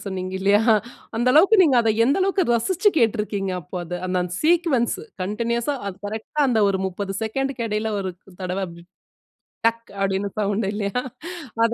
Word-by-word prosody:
சொன்னீங்க 185 -1 -4
இல்லையா, 205 +2 +4 0.6
அந்த 240 +2 +2
அளவுக்கு 385 +6 +6
நீங்க 270 -5 +4
அத 225 - +2 0.2
எந்த 280 - +2
அளவுக்கு 385 -1 +2
ரசிச்சு 375 - +2
கேட்டிருக்கீங்க 210 -3 0
அப்போ 175 +3 -9
அத. 175 - -10 0.2
அந்த 185 - -1
அந்த 180 - -5
சீக்வென்ஸ் 320 -7 +2 0.3
கன்டினியூஸ்ஸா 235 +7 -1
அது 195 -2 -4
கரெக்ட்டா 220 +8 -4
அந்த 230 -3 +2
ஒரு 195 -1 0
30 195 +1 -4
செகண்டுக்கு 260 +2 -2
இடையில 215 +1 -1
ஒரு 190 -1 -3 0.3
தடவ 185 +2 -2 1.1
டக் 230 0 0
அப்டின்னு 195 +1 0
சவுண்ட் 205 0 0
இல்லையா? 205 +3 -1 0.6
அத 230 - +4
220 Hz, 155 wpm, -23 LUFS, 195-255 Hz, 1.1 s, அளவுக்கு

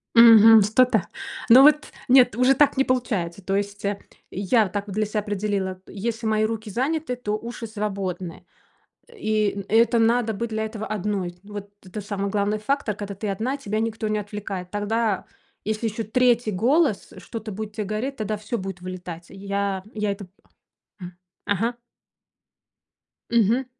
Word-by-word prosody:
Мгм, 225 -1 +9
что-то. 220 -1 +3 0.4
Ну 250 +4 +9
вот 300 +1 +5 0.2
нет, 250 -2 +6
уже 255 +3 +4
так 280 0 +3
не 270 - +4
получается. 210 -9 -1
То 195 +1 -1
есть, 200 0 -3
э, 200 0 -1 0.3
я 205 +3 +2
так 205 +1 -4
для 215 +2 0
себя 210 0 -2
определила, 200 -2 -2
если 225 +3 -4
мои 215 0 +2
руки 220 -1 -4
заняты, 265 +4 -1
то 240 -4 -4
уши 235 +1 -7
свободны, 190 -5 -4 0.7
и 215 - 0
н 200 -1 -5
это 230 +2 +4
надо 230 0 +2
быть 230 +3 -3
для 220 0 -1
этого 220 -1 -5
одной. 195 -4 -3
Вот 205 -1 -8
это 195 +3 -7
самый 200 0 -3
главный 205 +1 0
фактор, 220 -1 -1
когда 200 -1 -6
ты 205 +1 -4
одна, 235 +8 -2
тебя 215 -6 -3
никто 225 -1 -2
не 215 0 0
отвлекает, 200 -3 -6
тогда 210 0 -1 0.4
если 215 +2 -1
ещё 220 +1 -3
3 240 0 +2
голос, 250 - +2
что-то 225 -2 -7
будет 210 +1 -6
те 215 - -3
говорить, 215 +7 -3
тогда 215 -3 -3
всё 215 +3 -4
будет 190 -1 -6
вылетать, 180 -2 -8
и - - -12
я 200 -1 -2
я 210 -1 0
это 200 0 -6
п 180 - -27 0.7
м, 180 -1 -9 0.3
ага. 225 +5 0 1.6
Мгм. 235 +3 +3
215 Hz, 165 wpm, -24 LUFS, 200-230 Hz, 1.6 s, Мгм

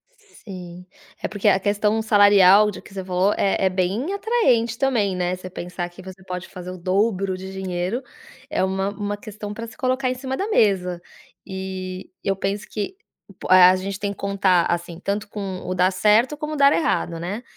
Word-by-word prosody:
Sim, 180 - -11 0.4
é - - -1
porque 210 0 -2
a 195 -1 +5
questão 210 +2 +1
salarial 205 -1 +6
de - - -9
que 195 - -16
você 190 -1 -5
falou, 185 +2 +1
é 195 -1 +1
é - - +4
bem 195 - -1
atraente 250 - +1
também, 225 -9 +1
né, 180 0 -1
você 185 0 -9
pensar 175 0 -5
que 175 +2 -13
você 190 0 -11
pode 180 0 -6
fazer 180 -1 -9
o 185 - -8
dobro 190 +1 0
de 190 +1 -8
dinheiro, 190 +4 -3 0.5
é 305 - 0
uma 190 +1 0
uma 205 0 -4
questão 210 0 -8
pra 230 +1 -6
se 220 - -13
colocar 255 0 0
em 255 - -1
cima 265 +1 -4
da 400 - -2
mesa, 180 - +2 0.4
e 190 -1 -6
eu 195 -1 0
penso 195 +2 -3
que 215 - -4 0.4
por - - -5
a 185 0 +8
gente 195 +1 -4
tem 205 -1 -2
que - - -19
contar 195 -3 +2
assim, 170 0 -3
tanto 205 +2 -2
com 195 -3 -5
o 185 - -2
dar 185 +1 +3
certo 215 +9 +3
como 305 0 -4
dar 280 0 +5
errado, 170 - 0
né. 200 +8 -4
195 Hz, 195 wpm, -22 LUFS, 185-215 Hz, 0.5 s, a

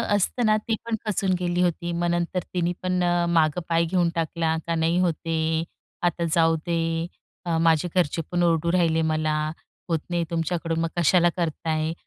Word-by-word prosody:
असतं 225 +4 +1
ना, 215 0 +4
ती 220 +1 -2
पण 230 -1 -1
खचून 195 -2 0
गेली 175 0 0
होती. 175 -1 0
मग 175 0 -1
नंतर 175 +1 0
तिने 175 0 0
पण 185 -1 0
अ, 175 0 +2
मागं 160 0 +2
पाय 165 0 +3
घेऊन 175 0 +1
टाकला 165 0 0
का, 170 - 0
"नाही 165 +1 +1
होत 180 -2 +2
आहे, 160 0 0 0.4
आता 175 0 +1
जाऊ 165 -1 +4
दे. 165 0 -1 0.4
अ, 165 -1 0
माझे 165 +1 +3
घरचे 165 -2 +1
पण 175 0 +1
ओरडू 170 0 +2
राहिले 165 -3 +2
मला, 155 0 0 0.5
होत 165 -2 +1
नाही 175 -1 0
तुमच्याकडून 165 0 -1
मग 165 - 0
कशाला 175 +1 +4
करता 165 -1 -2
आहे." 155 +1 0
170 Hz, 185 wpm, -24 LUFS, 165-175 Hz, 0.5 s, ना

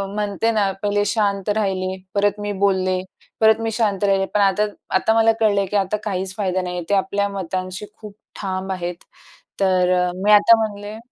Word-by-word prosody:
म्हणते 210 +2 0
ना, 205 -3 +1
पहिले 205 0 +1
शांत 200 -2 0
राहिले, 190 -2 -1 0.2
परत 205 +1 +1
मी 205 - -3
बोलले, 185 -2 +1 0.4
परत 220 0 +5
मी 225 0 -1
शांत 210 -3 0
राहिले. 195 -1 +2
पण 210 - +2
आता 200 +2 +3 0.3
आता 220 - +1
मला 225 0 +4
कळलंय, 205 -3 +2
की 195 - -5
आता 200 +2 0
काहीच 190 -2 -3
फायदा 185 -2 0
नाही 180 0 -5
आहे. 175 - -5
ते 205 - +1
आपल्या 200 +1 0
मतांशी 185 +1 -4
खूप 210 -2 -11 0.3
ठाम 190 -1 -3
आहेत. 175 -1 -3 0.6
तर 185 -2 +3
अ, 180 0 +1
मी 210 - +4
आता 210 +2 +7
म्हणले 205 +1 -9
200 Hz, 185 wpm, -21 LUFS, 185-210 Hz, 0.6 s, आता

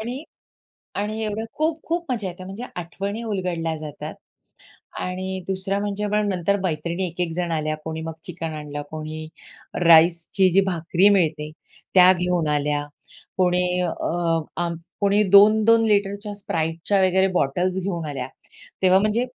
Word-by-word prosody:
आणि 245 +5 -5 0.7
आणि 215 +2 -2
एवढं 215 +1 -3
खूप-खूप 325 +2 -1
मजा 220 -6 -2
येते. 180 0 -8
म्हणजे 195 +5 -7
आठवणी 195 +5 -4
उलगडल्या 180 -6 -2
जातात 150 -2 -7 0.9
आणि 185 +1 -3
दुसऱ्या 190 +1 -1
म्हणजे 205 0 -2
पण 210 0 +2
नंतर 195 +1 +1
मैत्रिणी 170 +1 -2
1-1 170 0 -3
जण 175 0 -2
आल्या, 155 -1 -1
कोणी 160 0 -4
मग 160 0 -4
चिकन 165 -2 -5
आणलं, 150 -1 -6
कोणी 155 0 -6 0.6
राईसची 170 +3 +5
जी 195 - +7
भाकरी 175 +1 +2
मिळते 155 -4 0 0.4
त्या 185 0 +8
घेऊन 180 -3 0
आल्या, 145 0 0 0.5
कोणी 180 -1 +2 0.2
अ, 170 -1 -1 0.2
आम 170 -1 -3 0.2
कोणी 200 +1 +3
2-2 220 +2 +6
लिटरच्या 205 0 0
Spriteच्या 165 +3 -1
वगैरे 190 +1 +3
बॉटल्स 180 +7 0
घेऊन 175 -4 -3
आल्या. 135 -3 -4 0.6
तेव्हा 185 0 +6
म्हणजे 215 +5 +1
180 Hz, 135 wpm, -23 LUFS, 165-200 Hz, 0.9 s, त्या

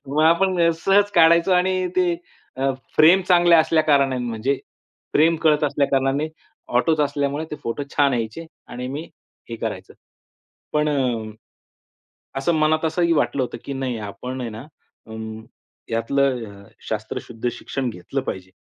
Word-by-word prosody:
मग 150 +3 +1
आपण 175 +3 +3 0.3
सहज 200 +1 +4
काढायचो 170 +2 +5
आणि 185 +1 +2
ते 180 -1 +3 0.4
अ, 135 +1 +1 0.3
फ्रेम 165 +5 +7
चांगल्या 175 -2 +6
असल्या 160 0 +2
कारणाने 140 -4 +2
म्हणजे, 120 +4 -1 0.5
फ्रेम 165 +2 +4
कळत 150 -2 +3
असल्या 145 -1 +1
कारणाने 135 +3 +1 0.5
ऑटोच 155 +5 +2
असल्यामुळे 145 +1 -1
ते 150 - -4
फोटो 115 +5 -3
छान 140 -2 +4
यायचे 115 +8 -4 0.2
आणि 125 +1 -6
मी 145 +4 -4 0.5
हे 115 - -4
करायचं. - - -5 0.8
पण 150 0 +2
अ, 125 -7 -1 1.1
असं 165 +5 +1
मनात 155 +1 +2
असंही 170 +1 +1
वाटलं 145 -3 +1
होतं, 125 - -4
की 140 - -5
नाही 130 -3 -3
आपण 130 +5 -6
आहे 120 -2 -4
ना 110 +5 -9 0.4
अ, 110 - -11 0.8
यातलं 125 +1 +1 0.2
अ, - - -19 0.2
शास्त्रशुद्ध 115 +2 -4
शिक्षण 125 +1 -4
घेतलं 110 +8 -4
पाहिजे. 95 -7 -6
145 Hz, 145 wpm, -22 LUFS, 125-165 Hz, 1.1 s, फ्रेम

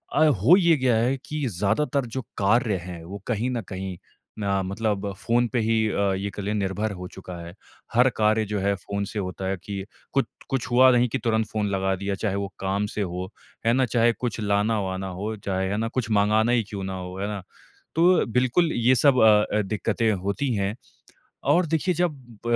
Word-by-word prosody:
अ, 155 - +5
हो 140 - +5
ये 170 -3 +4
गया 130 -3 +2
है 125 +4 +1
कि 150 +1 -3
ज़्यादातर 125 - 0
जो 130 - -1 0.2
कार्य 110 +2 +2
हैं 85 -2 -7
वो 95 +4 -7
कहीं 120 +1 0
न 120 -2 -2
कहीं 95 -1 -5 0.4
ना 100 -2 0
मतलब 100 +1 -2
फ़ोन 120 +1 +1
पे 125 - +2
ही 110 0 +2
अ, 100 -1 +1
ये 100 +1 -2
कह 100 - -7
लें 105 +2 -1
निर्भर 105 +1 -1
हो 90 -2 -7
चुका 90 -1 -9
है। 85 - -9 0.4
हर 125 +2 +5
कार्य 110 0 +3
जो 105 0 -2
है 100 +1 +1
फ़ोन 100 +1 -4
से 105 - -5
होता 95 0 -4
है 95 0 -1
कि 100 -1 -5 0.3
कुछ 135 - +2 0.2
कुछ 135 -3 -1
हुआ 130 +2 +7
नहीं 125 0 +4
कि 135 - -1
तुरंत 110 -1 +1
फ़ोन 105 -1 -2
लगा 95 0 0
दिया 100 +1 -3
चाहे 100 0 -2
वो 100 0 -2
काम 100 +2 0
से 105 - -1
हो, 90 -1 -3 0.4
है 115 - +4
ना? 130 +1 +3
चाहे 120 0 +3
कुछ 120 -2 -4
लाना-वाना 100 -2 0
हो 110 +2 -3
चाहे, 95 -2 -2
है 100 - -1
ना? 115 - 0
कुछ 115 0 -3
मँगाना 110 +2 +3
ही 120 -2 +3
क्यों 100 -2 -5
ना 95 0 -4
हो, 90 0 -7
है 100 - -2
ना? 105 -2 -4 0.5
तो 175 +3 +4
बिल्कुल 130 +8 +2
ये 120 +2 +3
सब 130 +1 +4
अ 105 -1 +5
अ, - - +3
दिक्कतें 110 +2 0
होती 100 +8 -1
हैं। 100 +1 -1 0.7
और 175 0 +4
देखिए 165 +4 0
जब 140 -10 -3
105 Hz, 210 wpm, -25 LUFS, 100-125 Hz, 0.7 s, हुआ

